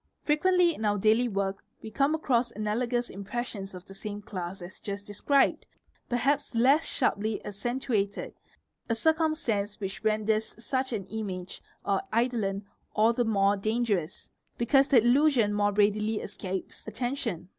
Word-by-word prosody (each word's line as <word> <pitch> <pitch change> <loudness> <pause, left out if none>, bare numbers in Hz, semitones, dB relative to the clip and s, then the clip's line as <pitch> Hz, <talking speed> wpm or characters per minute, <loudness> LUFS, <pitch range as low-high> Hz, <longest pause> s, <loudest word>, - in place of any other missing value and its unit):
Frequently 350 +3 +3
in 225 - -7
our 205 -1 +2
daily 220 +4 +3
work 195 -2 -2 0.2
we 220 - -7
come 280 +5 +2
across 250 -6 +1
analogous 235 +3 -1
impressions 200 -1 -5
of 180 - -10
the 195 - -12
same 205 +1 -6
class 195 -3 -6
as 180 +3 -10
just 200 -2 -5
described, 270 +7 +2 0.4
perhaps 275 +2 0
less 270 +7 +4
sharply 220 -4 0
accentuated, 210 -1 -2 0.6
a 230 - +2
circumstance 280 -9 0
which 195 +1 -5
renders 215 0 +1
such 260 +3 -2
an 205 -5 -3
image 195 -3 -5 0.2
or - - +1 0.2
eidolon 220 -5 0 0.3
all 220 +2 +4
the 245 - +1
more 200 -3 +3
dangerous, 205 -5 -1 0.3
because 270 +4 +4
the 275 - +5
illusion 245 -4 +4
more 205 0 +2
readily 210 +1 +2
escapes 190 -2 -6
attention. 240 -9 -3
220 Hz, 140 wpm, -28 LUFS, 200-250 Hz, 0.6 s, the